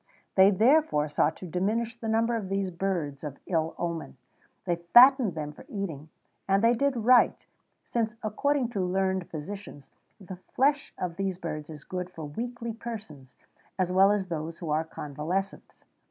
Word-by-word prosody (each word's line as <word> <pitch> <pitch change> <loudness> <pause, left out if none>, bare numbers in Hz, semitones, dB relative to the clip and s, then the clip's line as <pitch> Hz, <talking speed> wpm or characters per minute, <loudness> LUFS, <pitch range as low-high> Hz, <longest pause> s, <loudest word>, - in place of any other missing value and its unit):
They 190 0 +7
therefore 220 - +3
sought 155 +2 +1
to - - -9
diminish 215 +7 -1
the 230 -1 -7
number 225 +2 +2
of 205 -5 -4
these 195 -1 -1
birds 170 -6 -3
of 145 -2 -6
ill 165 -2 -1
omen; 170 -5 -4 0.5
they 175 -2 0
fattened 240 - +6
them 150 -2 -4
for 150 - -14
eating, 160 -7 -5 0.4
and 195 +2 +2
they 230 +1 +5
did 280 +2 +1
right, 245 +2 +4 0.4
since, 230 -1 -2
according 255 +4 0
to 205 -5 -2
learned 190 0 0
physicians, 165 -2 -8 0.3
the 185 -2 -9
flesh 280 +9 0
of 175 -2 -4
these 195 -2 -2
birds 155 -4 -5
is 150 -2 -10
good 180 -1 -5
for 165 -4 -8
weakly 235 +8 -5
persons, 210 - -9 0.4
as 185 -2 0
well 190 +2 +5
as 205 -2 0
those 165 -2 -5
who 165 -4 -5
are 155 +1 +2
convalescent. 160 +5 -4
190 Hz, 165 wpm, -28 LUFS, 160-225 Hz, 0.5 s, They